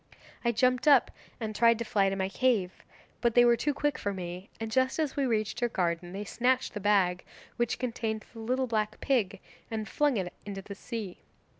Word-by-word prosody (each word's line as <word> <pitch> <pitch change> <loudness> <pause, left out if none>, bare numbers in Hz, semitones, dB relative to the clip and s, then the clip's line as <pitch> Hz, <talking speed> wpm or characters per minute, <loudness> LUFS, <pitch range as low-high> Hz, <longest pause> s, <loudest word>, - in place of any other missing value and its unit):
I 235 - +3
jumped 250 +4 +2
up 280 -4 +6 0.3
and 215 -2 -4
tried 230 0 +5
to 235 - -3
fly 200 -2 +2
to 195 - -2
my 190 -1 -1
cave, 200 -3 0 0.4
but 235 -2 +2
they 245 0 +7
were 240 0 +6
too 275 +5 0
quick 295 +1 -1
for 200 -1 -2
me, 180 +1 -6
and 225 0 -4
just 260 +2 +2
as 310 -4 -1
we 275 -2 +1
reached 215 -2 -1
your 240 - +2
garden 175 -3 -1
they 200 +2 -4
snatched 250 +4 0
the 210 - -4
bag 190 -3 +2 0.3
which 240 -1 0
contained 225 -3 -3
the 225 - -10
little 255 +4 0
black 215 -3 -1
pig 210 -8 0 0.3
and 220 -2 -3
flung 290 -5 +1
it 180 -2 -3
into 195 -1 -6
the 200 - -7
sea. 205 -2 -6
220 Hz, 205 wpm, -29 LUFS, 195-245 Hz, 0.4 s, they